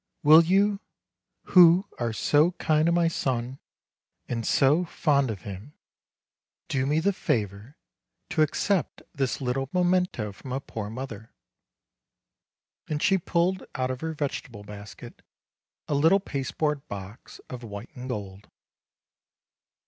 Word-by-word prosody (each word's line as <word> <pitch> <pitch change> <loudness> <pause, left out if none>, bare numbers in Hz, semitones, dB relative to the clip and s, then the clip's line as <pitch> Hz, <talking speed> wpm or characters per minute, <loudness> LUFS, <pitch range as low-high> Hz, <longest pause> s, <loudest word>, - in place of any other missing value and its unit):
Will 155 +3 +8
you, 195 +4 +2 0.6
who 180 +1 +6
are 120 -2 -1
so 150 +9 +3
kind 155 -2 +1
to - - +3
my 170 0 +3
son, 130 -5 -2 0.7
and 115 -2 -3
so 150 +6 +3
fond 145 -6 +1
of 100 -5 -5
him, 100 +8 -8 1.0
do 135 -3 0
me 150 +2 +2
the 200 +5 +1
favor 105 - -3 0.5
to - - +1
accept 175 +4 0
this 135 -3 -1
little 135 +1 -2
memento 180 - +1
from 125 +6 -9
a 135 - -1
poor 110 -6 -6
mother?" 115 -2 -8 1.5
and 150 - -1
she 195 -1 +3
pulled 175 +2 0
out 130 0 -1
of 130 - -6
her 160 0 -3
vegetable 130 -7 -4
basket 105 -3 -11 0.7
a - - -1
little 160 +7 +4
pasteboard 150 -2 -3
box 100 +2 -9
of 125 -1 -8
white 100 0 -8
and 130 0 -7
gold. 100 -4 -6
135 Hz, 130 wpm, -26 LUFS, 115-165 Hz, 1.5 s, Will